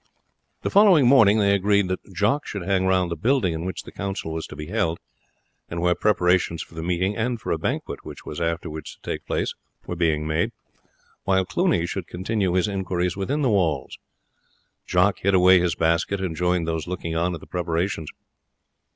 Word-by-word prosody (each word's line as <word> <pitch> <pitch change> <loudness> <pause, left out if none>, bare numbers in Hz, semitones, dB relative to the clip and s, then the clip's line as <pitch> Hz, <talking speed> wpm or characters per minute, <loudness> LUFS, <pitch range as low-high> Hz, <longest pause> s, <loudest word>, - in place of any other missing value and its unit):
The - - -1
following 195 -9 +6
morning 115 -5 +6
they 100 -2 +3
agreed 100 0 +2
that 95 +2 -5
Jock 105 +10 0
should 100 -3 -5
hang 95 0 +1
round 95 -2 +2
the - - -1
building 120 -7 +1
in 80 +1 -4
which 95 -2 -4
the - - -11
council 95 -5 -4
was 80 0 -4
to - - -10
be 75 +1 -6
held, 85 -3 -1 0.7
and 85 - -4
where 90 +1 +3
preparations 90 -3 +1
for - - -19
the 80 - -6
meeting 90 +4 0
and 120 +1 -1
for - - -4
a - - 0
banquet - - -3
which - - -10
was 75 - -6
afterwards 80 -2 -3
to - - -36
take - - -5
place - - -1 0.3
were 90 - -4
being 80 -3 +1
made, 80 +1 0 0.7
while 95 -1 +2
Cluny 170 - +1
should 90 0 -4
continue 95 0 -1
his 95 +3 +2
inquiries 90 -3 -1
within 135 +10 -1
the 130 - +3
walls. 90 -7 0 0.9
Jock 90 +2 +2
hid 100 0 +2
away 90 0 +6
his 85 -2 0
basket 85 +4 +1
and 90 -4 -3
joined 90 0 0
those 80 0 -2
looking 85 -2 -4
on 85 +2 0
at - - -8
the - - -13
preparations. 85 -2 -2
90 Hz, 195 wpm, -24 LUFS, 85-100 Hz, 0.9 s, following